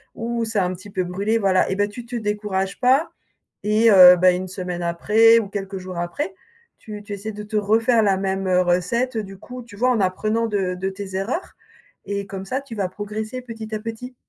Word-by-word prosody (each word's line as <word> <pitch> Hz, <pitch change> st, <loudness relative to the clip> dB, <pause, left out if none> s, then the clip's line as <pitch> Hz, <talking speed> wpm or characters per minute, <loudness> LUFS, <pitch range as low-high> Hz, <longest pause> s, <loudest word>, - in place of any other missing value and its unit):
«Ouh, 235 Hz, 0 st, -2 dB
ça 220 Hz, -3 st, 0 dB
a -, -, +1 dB
un 185 Hz, -, -3 dB
petit 185 Hz, +3 st, -11 dB
peu 185 Hz, -1 st, -1 dB
brûlé», 200 Hz, +5 st, 0 dB
voilà 190 Hz, -3 st, +2 dB
et 190 Hz, -, -1 dB
bah, 205 Hz, +1 st, +1 dB
tu 230 Hz, +3 st, -9 dB
te 245 Hz, -, -6 dB
décourages 210 Hz, -3 st, -2 dB
pas 265 Hz, +6 st, +3 dB, 0.5 s
et 215 Hz, +2 st, +4 dB
heu, 180 Hz, -2 st, +10 dB
bah, 180 Hz, +1 st, +5 dB
1 185 Hz, +1 st, -3 dB
semaine 180 Hz, -2 st, -5 dB
après 215 Hz, +7 st, +4 dB
ou 215 Hz, -, -4 dB
quelques 195 Hz, -1 st, -5 dB
jours 185 Hz, -1 st, -8 dB
après, 290 Hz, -, -3 dB, 0.5 s
tu 210 Hz, -1 st, -9 dB
tu 205 Hz, 0 st, -7 dB
essaies 205 Hz, +2 st, -5 dB
de 210 Hz, -, -7 dB
te 215 Hz, +1 st, -7 dB
refaire 225 Hz, +3 st, +3 dB
la 200 Hz, -2 st, +3 dB
même, 190 Hz, 0 st, -2 dB
heu, 185 Hz, 0 st, +3 dB
recette, 185 Hz, +9 st, 0 dB
heu, 220 Hz, -, -1 dB
du 195 Hz, -1 st, -10 dB
coup, 250 Hz, +4 st, -9 dB
tu 230 Hz, -3 st, -14 dB
vois 250 Hz, +4 st, +2 dB
en 235 Hz, -, +1 dB
apprenant 215 Hz, +5 st, 0 dB
de 195 Hz, -4 st, -1 dB
de 190 Hz, +1 st, -2 dB
tes 195 Hz, -1 st, -7 dB
erreurs 220 Hz, -, -3 dB, 0.5 s
et 200 Hz, 0 st, -3 dB
comme 195 Hz, -1 st, -7 dB
ça 260 Hz, +7 st, -2 dB
tu 260 Hz, -5 st, -10 dB
vas 195 Hz, -3 st, -1 dB
progresser 215 Hz, +5 st, -5 dB
petit 225 Hz, -3 st, -8 dB
à -, -, -3 dB
petit. 230 Hz, +3 st, -7 dB
205 Hz, 225 wpm, -22 LUFS, 190-225 Hz, 0.5 s, heu